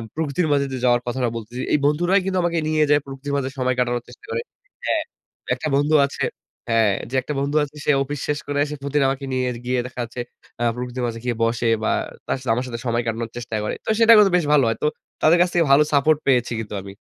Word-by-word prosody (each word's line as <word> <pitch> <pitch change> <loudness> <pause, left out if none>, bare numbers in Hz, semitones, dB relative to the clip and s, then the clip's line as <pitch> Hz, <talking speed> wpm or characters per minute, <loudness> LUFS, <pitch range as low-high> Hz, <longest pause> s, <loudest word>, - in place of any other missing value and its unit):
প্রকৃতির 160 +2 0
মাঝে 140 -1 +2
যে - - -2
যাওয়ার 120 -1 +4
কথাটা 120 0 0
বলতেছি। 115 +3 -6
এই - - +5
বন্ধুরাই 175 +6 +3
কিন্তু 190 -1 -1
আমাকে 170 -1 0
নিয়ে 155 0 +2
যায় 145 0 +5
প্রকৃতির 135 +1 -6
মাঝে 135 -1 -2
সময় 130 -1 0
কাটানোর 120 -1 0
চেষ্টা 415 - -15
করে 465 0 -1 0.4
হ্যাঁ। 320 -1 +1 0.5
একটা 155 - -3
বন্ধু 145 +2 +2
আছে 140 - -5 0.5
হ্যাঁ। 115 -2 +4 0.2
যে - - -13
একটা 150 - -4
বন্ধু 140 +2 -1
আছে 145 0 -7
সে - - +4
অফিস 145 +1 -5
শেষ 150 0 0
করে 145 0 -2
এসে 150 0 -5
প্রতিদিন 140 +1 0
আমাকে 135 +1 -3
নিয়ে 130 -1 0 0.2
গিয়ে 125 0 0
দেখা 125 0 -11
যাচ্ছে 120 +1 -8 0.4
আ - - +1
প্রকৃতির 125 0 -4
মাঝে 115 -1 -5
গিয়ে 120 -2 -1
বসে 115 +1 0 0.2
বা - - +1 0.4
তার - - 0
সাথে 130 -3 -1
আমার 125 +2 -2
সাথে 115 -2 -5
সময় 120 0 0
কাটানোর 115 0 -2
চেষ্টা 115 -2 -5
করে। 105 - -2
তো - - -4
সেটা 230 0 +8
করলে 205 -2 +6
বেশ 170 - 0
ভালো 145 -2 +5
হয়। 115 - 0
তো 150 - +4 0.3
তাদের 165 +3 +5
কাছ 180 - +4
থেকে 170 -1 +3
ভালো 140 +2 +7
সাপোর্ট 150 +2 +4
পেয়েছি 125 -3 +3
কিন্তু 105 -2 -6
আমি। 100 +1 -9
135 Hz, 235 wpm, -22 LUFS, 120-150 Hz, 0.5 s, সেটা